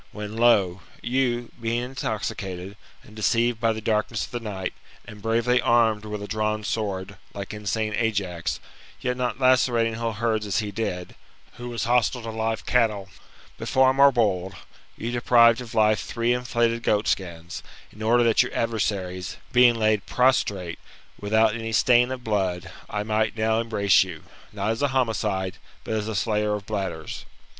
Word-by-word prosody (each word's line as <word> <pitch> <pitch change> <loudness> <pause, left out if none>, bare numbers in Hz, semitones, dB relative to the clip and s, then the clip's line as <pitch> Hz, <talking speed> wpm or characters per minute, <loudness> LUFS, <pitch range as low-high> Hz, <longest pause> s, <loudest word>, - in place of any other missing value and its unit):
Whetr, 105 0 -6
lo! 105 -6 +3 0.2
you, 120 -1 0
being 115 +1 -1
intoxicated, 100 -6 -4 0.3
and 105 - -16
deceived 115 +2 +1
by 115 0 +2
the 110 0 -4
darkness 110 +1 0
of - - -16
the 120 - -3
night, 100 -5 -4 0.3
and 105 -1 -11
bravely 115 +3 +2
armed 110 -2 +3
with 105 -1 -5
a - - -6
drawn 110 0 -1
sword, 100 -3 -3 0.2
like 100 0 -6
insane 105 +1 -2
Ajax, 100 -7 -1 0.4
yet 125 0 -1
not 125 +1 -2
lacerating 125 -3 +3
whole 115 0 -2
herds 110 0 -1
as 100 - -1
he 105 -2 -1
did, 90 -4 -4 0.4
who 120 0 -6
was 120 -1 -3
hostile 120 0 +1
to 115 - -5
live 110 -2 -2
cattle; 105 -6 +1 0.5
but - - -5
far 130 0 +4
more 140 +1 +6
bold, 95 -6 0 0.4
you 115 - -4
deprived 120 0 +5
of 120 -1 -9
life 110 -1 +4
three 115 +1 0
inflated 120 -1 0
goat 105 -2 +1
skins, 85 -3 -3 0.3
in 105 - -14
order 120 +2 +4
that 115 -1 +4
your 125 - -3
adversaries, 95 -5 -2 0.2
being 125 -1 +6
laid 110 -2 +1
prostrate, 100 -9 +1 0.4
without 110 +1 +3
any 115 0 -4
stain 120 +2 +4
of 130 -1 -5
blood, 95 -5 -1 0.2
I 105 0 -2
might 110 +1 0
now 110 +1 +2
embrace 105 -4 +3
you, - - -9 0.3
not 105 +1 -1
as 115 - -3
a 145 - +3
homicide, 110 -8 -1 0.3
but - - -4
as 110 -1 -1
a 110 - -3
slayer 105 +1 0
of 100 -1 -7
bladders." 95 -7 -4
110 Hz, 165 wpm, -25 LUFS, 105-120 Hz, 0.5 s, more